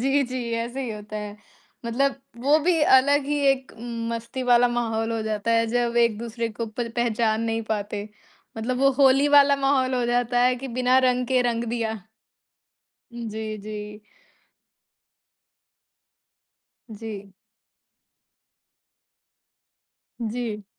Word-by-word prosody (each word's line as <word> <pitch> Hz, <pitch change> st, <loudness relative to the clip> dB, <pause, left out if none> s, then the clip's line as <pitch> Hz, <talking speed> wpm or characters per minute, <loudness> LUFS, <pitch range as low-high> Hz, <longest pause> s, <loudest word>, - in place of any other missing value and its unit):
जी, 275 Hz, +3 st, +2 dB
जी 250 Hz, -2 st, -4 dB
ऐसे 235 Hz, +3 st, -3 dB
ही 250 Hz, -, -4 dB
होता 210 Hz, 0 st, -7 dB
है। 210 Hz, -1 st, -6 dB, 0.5 s
मतलब 270 Hz, +4 st, 0 dB, 0.2 s
वो 290 Hz, +3 st, +4 dB
भी 345 Hz, -3 st, +3 dB
अलग 285 Hz, +1 st, +5 dB
ही 295 Hz, 0 st, 0 dB
एक 265 Hz, -1 st, +1 dB
उम, 230 Hz, 0 st, -6 dB
मस्ती 235 Hz, +3 st, -5 dB
वाला 245 Hz, 0 st, +4 dB
माहौल 230 Hz, -1 st, -1 dB
हो 225 Hz, -, -2 dB
जाता 215 Hz, +1 st, -2 dB
है 230 Hz, 0 st, +3 dB
जब 240 Hz, +1 st, 0 dB
एक-दूसरे 230 Hz, 0 st, 0 dB
को 230 Hz, -, -2 dB
प 230 Hz, +2 st, -4 dB
पहचान 225 Hz, -2 st, +1 dB
नहीं 225 Hz, 0 st, -1 dB
पाते। 205 Hz, 0 st, -4 dB, 0.5 s
मतलब 250 Hz, +3 st, -2 dB
वो 275 Hz, 0 st, +4 dB
होली 275 Hz, +1 st, +5 dB
वाला 280 Hz, 0 st, +5 dB
माहौल 265 Hz, -2 st, +2 dB
हो 250 Hz, -1 st, 0 dB
जाता 245 Hz, 0 st, +1 dB
है 250 Hz, +1 st, +4 dB
कि 270 Hz, +2 st, -7 dB
बिना 255 Hz, +1 st, +4 dB
रंग 250 Hz, 0 st, 0 dB
के 255 Hz, 0 st, +2 dB
रंग 235 Hz, -1 st, -1 dB
दिया। 225 Hz, -2 st, -2 dB, 1.2 s
जी, 220 Hz, -2 st, -5 dB
जी। 210 Hz, 0 st, -8 dB, 2.9 s
जी। 205 Hz, -2 st, -8 dB, 2.9 s
जी। 225 Hz, -2 st, -4 dB
235 Hz, 125 wpm, -24 LUFS, 220-255 Hz, 2.9 s, अलग